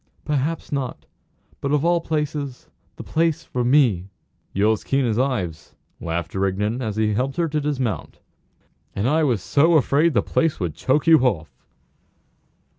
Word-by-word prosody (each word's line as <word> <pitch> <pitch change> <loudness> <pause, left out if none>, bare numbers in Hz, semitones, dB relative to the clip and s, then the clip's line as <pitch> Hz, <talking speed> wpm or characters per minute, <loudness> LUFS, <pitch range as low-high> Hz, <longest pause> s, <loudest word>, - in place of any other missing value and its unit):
"Perhaps 150 +2 -2
not. 135 -3 -3 0.5
But, 140 - -2
of 150 +1 +1
all 170 0 +3
places, 150 -4 -3 0.2
the - - -8
place 165 -1 0
for 125 - -3
me!" 120 -8 +3 0.4
"You're 105 +3 +3
as 110 - -5
keen 135 -1 +1
as 115 -1 0
Ives," 100 - -2 0.2
laughed 85 +1 -4
Rigden 100 +5 -1
as 110 -4 -3
he 110 -1 +1
helped 130 +5 -1
her 170 -1 +1
to 150 0 -1
dismount. 135 -7 -2 0.8
"And 100 +4 0
I 155 +4 +2
was 120 -10 +1
so 160 +4 +3
afraid 150 +1 +3
the 105 - +3
place 165 -3 0
would 85 -4 -2
choke 130 - 0
you 165 -1 +7
off!" 100 -12 0
130 Hz, 160 wpm, -22 LUFS, 105-150 Hz, 0.8 s, you